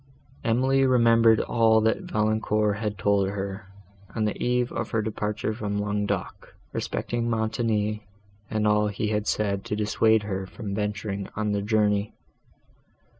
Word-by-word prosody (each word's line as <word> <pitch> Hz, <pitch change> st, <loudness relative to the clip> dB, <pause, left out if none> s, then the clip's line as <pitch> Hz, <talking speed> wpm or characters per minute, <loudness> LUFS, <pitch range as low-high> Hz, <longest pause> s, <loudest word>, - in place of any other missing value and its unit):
Emily 130 Hz, +4 st, +2 dB
remembered 115 Hz, -3 st, +5 dB
all 110 Hz, -1 st, +3 dB
that 110 Hz, 0 st, 0 dB
Valancourt 105 Hz, -1 st, +1 dB
had 105 Hz, -2 st, -3 dB
told 100 Hz, +1 st, +2 dB
her, 100 Hz, 0 st, -5 dB, 0.5 s
on 110 Hz, -2 st, 0 dB
the 105 Hz, -, -1 dB
eve 125 Hz, 0 st, +1 dB
of 115 Hz, -, -3 dB
her 115 Hz, -, 0 dB
departure 105 Hz, 0 st, -2 dB
from 105 Hz, -2 st, -3 dB
Languedoc, 105 Hz, 0 st, -3 dB, 0.2 s
respecting 120 Hz, 0 st, -2 dB
Montoni, 110 Hz, -2 st, -1 dB, 0.4 s
and 110 Hz, -1 st, 0 dB
all 105 Hz, 0 st, +3 dB
that 105 Hz, -, -5 dB
he 105 Hz, -, -1 dB
had 105 Hz, 0 st, -1 dB
said 100 Hz, -2 st, 0 dB
to -, -, -2 dB
dissuade 110 Hz, +1 st, +2 dB
her 95 Hz, -2 st, -4 dB
from 105 Hz, -1 st, -6 dB
venturing 100 Hz, -1 st, -3 dB
on 105 Hz, 0 st, -1 dB
the 100 Hz, 0 st, 0 dB
journey. 105 Hz, -1 st, +1 dB
105 Hz, 145 wpm, -26 LUFS, 105-110 Hz, 0.5 s, remembered